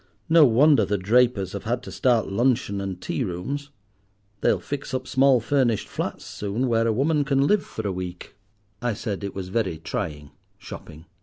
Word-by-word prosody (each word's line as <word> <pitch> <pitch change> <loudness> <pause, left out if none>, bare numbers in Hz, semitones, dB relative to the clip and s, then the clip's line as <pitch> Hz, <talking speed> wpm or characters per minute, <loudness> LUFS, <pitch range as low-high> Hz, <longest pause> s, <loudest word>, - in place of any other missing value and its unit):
No 160 -1 +7
wonder 135 +1 +5
the 100 +1 0
drapers 105 -1 +2
have 100 - -6
had 120 +2 -1
to - - -8
start 120 -3 +2
luncheon 115 -2 +1
and 95 -2 -4
tea 130 - -2
rooms. 130 +10 -4 0.7
They'll - - +2
fix 140 -2 -5
up 130 0 -3
small 135 -1 +4
furnished 120 -3 +1
flats - - -4
soon, 105 +6 -3
where 115 -1 +2
a - - +3
woman 145 +6 +2
can 135 0 +2
live 210 +5 +3
for 110 -2 -5
a - - -1
week." 90 -1 -7 0.5
I 120 -3 -1
said 100 -1 -4
it 100 - -5
was 95 -2 -5
very 95 -5 -1
trying, 75 -3 -5 0.3
shopping. 80 +2 -10
115 Hz, 180 wpm, -24 LUFS, 95-135 Hz, 0.7 s, No